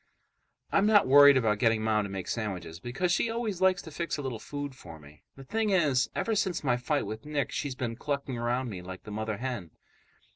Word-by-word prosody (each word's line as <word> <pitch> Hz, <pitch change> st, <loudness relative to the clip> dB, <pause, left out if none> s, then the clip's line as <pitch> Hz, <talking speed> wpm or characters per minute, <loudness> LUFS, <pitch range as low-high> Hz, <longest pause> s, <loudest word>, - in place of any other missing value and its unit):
I'm 200 Hz, +1 st, +3 dB
not 210 Hz, -6 st, +5 dB
worried 145 Hz, 0 st, +8 dB
about 110 Hz, -4 st, +1 dB
getting 110 Hz, -1 st, +2 dB
Mom 105 Hz, -1 st, +1 dB
to -, -, -6 dB
make 95 Hz, -2 st, -5 dB
sandwiches 90 Hz, -7 st, -4 dB
because 130 Hz, -, -2 dB
she 225 Hz, -, +2 dB
always 225 Hz, -5 st, -3 dB
likes 190 Hz, -1 st, +3 dB
to 160 Hz, -, -10 dB
fix 155 Hz, -2 st, -3 dB
a 145 Hz, -, -5 dB
little 125 Hz, -4 st, -4 dB
food 145 Hz, +3 st, -6 dB
for 85 Hz, -10 st, -12 dB
me. 75 Hz, 0 st, -16 dB
The 135 Hz, -, -11 dB
thing 220 Hz, +9 st, -1 dB
is, 150 Hz, -9 st, +2 dB
ever 225 Hz, -, 0 dB
since 190 Hz, -6 st, 0 dB
my 130 Hz, -4 st, +2 dB
fight 140 Hz, +4 st, -1 dB
with 110 Hz, +3 st, -6 dB
Nick, 150 Hz, -2 st, -2 dB
she's 140 Hz, -3 st, -3 dB
been 120 Hz, -2 st, -3 dB
clucking 140 Hz, -1 st, -3 dB
around 120 Hz, +2 st, -1 dB
me 95 Hz, -6 st, -6 dB
like 95 Hz, +1 st, -9 dB
the 105 Hz, -, -9 dB
mother 110 Hz, 0 st, -3 dB
hen. 120 Hz, -8 st, -4 dB
130 Hz, 220 wpm, -29 LUFS, 110-150 Hz, -, worried